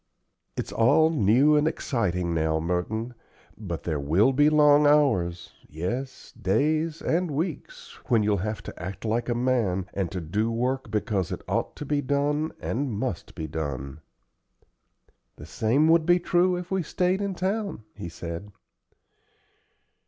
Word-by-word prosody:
"It's - - -3
all 155 +8 +4
new 135 +3 +4
and 150 +1 +3
exciting 90 - -1
now, 80 -1 +1
Merton, 90 +8 -2 0.4
but 90 -7 -6
there 80 -4 -2
will 85 - +3
be 145 +3 +5
long 150 -1 +5
hours 95 - +2 0.2
yes, 120 - -5
days 155 - 0
and 175 +1 +1
weeks 195 - -5
when 115 -5 +3
you'll 105 -1 +2
have 105 +3 -4
to - - -9
act 95 +4 -6
like 115 +3 -1
a 120 - +1
man, 120 -7 +1
and 95 -4 -2
to 95 - -3
do 105 +8 -1
work 125 +2 -1
because 105 -3 -1
it 90 - -5
ought - - -1
to 150 - -7
be 145 0 0
done 145 +3 0
and 135 +2 -2
must 105 -3 -4
be 80 - -4
done." 70 -2 -5 1.4
"The - - -11
same 135 +8 +2
would 165 0 +4
be 175 0 +6
true 175 +1 +2
if 180 +1 -6
we 190 -1 +1
stayed 180 +3 0
in 200 -2 -2
town," 195 - -2
he 85 - -7
said. 85 +4 -7
120 Hz, 150 wpm, -26 LUFS, 90-150 Hz, 1.4 s, be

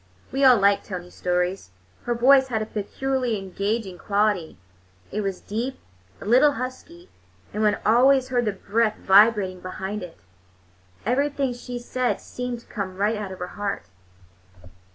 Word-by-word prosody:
We 270 +1 0
all 255 -2 +8
liked 200 0 +3
Tony's 180 -2 -7
stories. 180 - -1 0.4
Her 240 - 0
voice 265 +3 +5
had 220 -4 -1
a - - -5
peculiarly 245 +3 -2
engaging 195 0 -3
quality; 205 -5 0 0.5
it 215 - -2
was 195 -2 -3
deep, 240 +6 -3 0.4
a - - -9
little 260 +7 +5
husky, 270 +9 -7 0.4
and 210 - -2
one 210 -1 +3
always 255 +3 +4
heard 245 -2 +1
the 210 - +1
breath 215 +3 0
vibrating 195 -2 +4
behind 190 +3 -5
it. 180 -2 -9 0.9
Everything 275 +2 0
she 245 0 -7
said 245 +1 -1
seemed 250 -1 -5
to - - -23
come 190 -4 -5
right 210 +3 +1
out 210 -3 -5
of 190 - -7
her 180 0 -5
heart. 200 - -4
215 Hz, 155 wpm, -24 LUFS, 195-250 Hz, 0.9 s, all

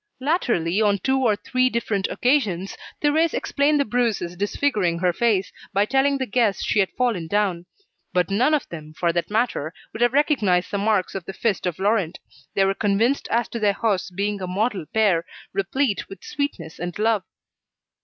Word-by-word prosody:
Latterly, 235 - +1
on 205 -2 +3
two 265 +6 +1
or 220 -4 +3
three 255 +4 +1
different 215 -5 -1
occasions, 215 -9 0 0.3
Thérèse 315 +2 +3
explained 290 +1 +1
the 280 - +2
bruises 220 -7 -1
disfiguring 205 -2 0
her 180 0 +1
face, 205 -3 +1 0.2
by 200 +1 +3
telling 275 +4 +2
the 260 - -1
guests 225 -3 +1
she 215 - +1
had 190 - +3
fallen 230 -10 0
down. 185 -2 0 0.4
But 180 0 +1
none 250 +10 +3
of 295 - -2
them, 155 -2 -9
for 170 -1 +1
that 170 0 -1
matter, 210 -8 -1 0.2
would 220 - -6
have 240 +1 +3
recognised 225 - +2
the 200 - -1
marks 205 -2 +1
of 190 -3 -5
the 195 - -6
fist 205 -5 -1
of 175 - -2
Laurent; 195 -4 0 0.4
they 195 - +4
were 195 - +2
convinced 220 +7 +1
as 235 +1 +1
to 235 - -4
their 205 -2 +3
hosts 200 -3 0
being 200 +2 -2
a 185 - -3
model 195 -2 -1
pair, 200 -7 +3 0.3
replete 205 +4 -1
with 195 -1 -11
sweetness 200 - -4
and 175 0 -4
love. 215 -1 +2
205 Hz, 185 wpm, -23 LUFS, 185-245 Hz, 0.4 s, they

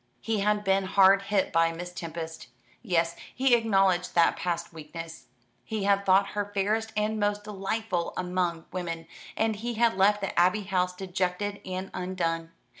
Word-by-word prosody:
He 225 -2 -1
had 210 +1 +1
been 195 -1 +2
hard 195 +1 +5
hit 195 -1 0
by 165 0 +4
Miss 175 +2 -7
Tempest. 165 -4 -6 0.3
Yes, 170 -6 +1 0.2
he 260 0 +3
acknowledged 195 -6 +2
that 170 -1 +5
past 170 -1 -3
weakness. 165 +1 -9 0.4
He 215 -2 -3
had 200 0 +2
thought 195 +1 +5
her 205 0 -3
fairest 215 +3 0
and 215 +1 0
most 205 0 0
delightful 205 -2 -2
among 180 -2 -1
women, 170 -2 -4 0.3
and 220 -1 +1
he 235 +2 -4
had 230 -1 +3
left 205 +2 +3
the 195 - -1
Abbey 185 +4 +3
House 180 -2 0
dejected 190 +2 -2
and 185 +1 -5
undone. 170 -3 -2
190 Hz, 160 wpm, -28 LUFS, 175-205 Hz, 0.4 s, hard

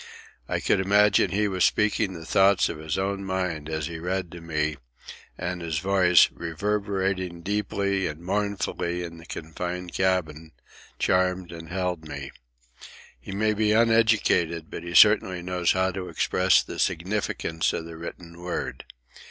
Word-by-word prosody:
I - - 0
could - - +2
imagine 100 0 +4
he 105 +3 +1
was 95 -2 0
speaking 105 -2 +2
the 80 -2 -9
thoughts 95 +2 +4
of - - -6
his 80 -1 -3
own 100 +1 -2
mind 90 -5 -3
as 80 -2 -2
he 80 +1 -6
read 90 0 -3
to 85 - -9
me, 75 -2 -2 0.6
and 90 0 -4
his 80 -3 -2
voice, 90 0 +5
reverberating 95 0 -2
deeply 100 -1 -1
and 75 +1 -6
mournfully 95 -2 -2
in 85 -1 -8
the 85 - -14
confined 90 +2 -5
cabin, 80 -4 -1 0.4
charmed 90 -1 +1
and 80 -1 -9
held 90 -3 -3
me. 70 -2 -7 0.9
He 70 - -9
may 105 +2 +1
be 105 0 +2
uneducated, 110 -8 +2
but - - -6
he 85 0 -6
certainly 95 -1 +5
knows 90 -1 +1
how 95 0 +1
to 90 0 -6
express - - +3
the - - -8
significance 90 -2 -1
of 80 - -4
the 85 0 -9
written 85 +1 -9
word. 90 0 -4
90 Hz, 150 wpm, -25 LUFS, 85-100 Hz, 0.9 s, voice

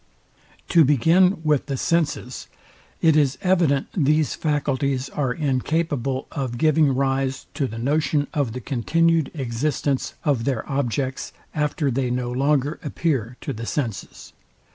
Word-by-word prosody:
Part. - - -38
II. - - -33
Sect. - - -31
6. - - -7
To 165 -2 +7
begin 165 - +4
with 150 -3 +2
the 135 -2 -2
SENSES, 150 -5 -1 0.6
it 160 -2 +5
is 140 -3 +2
evident 170 -7 +2
these 155 -2 +2
faculties 140 -3 -1
are 135 -3 -1
incapable 140 -1 -1
of 130 -4 -3
giving 155 -1 +3
rise 135 0 -1
to 140 - -1
the 115 - -7
notion 145 +4 +1
of 140 -7 -1
the 125 - -5
continued 160 +5 +1
existence 135 +1 -1
of 135 -6 +1
their 130 -5 -1
objects, 135 -1 -2 0.2
after 150 -1 0
they 125 0 0
no 125 0 -2
longer 140 +3 +1
appear 135 -6 -2
to 140 - -4
the 115 0 -6
senses. 115 -9 -4
140 Hz, 150 wpm, -23 LUFS, 130-155 Hz, 0.6 s, To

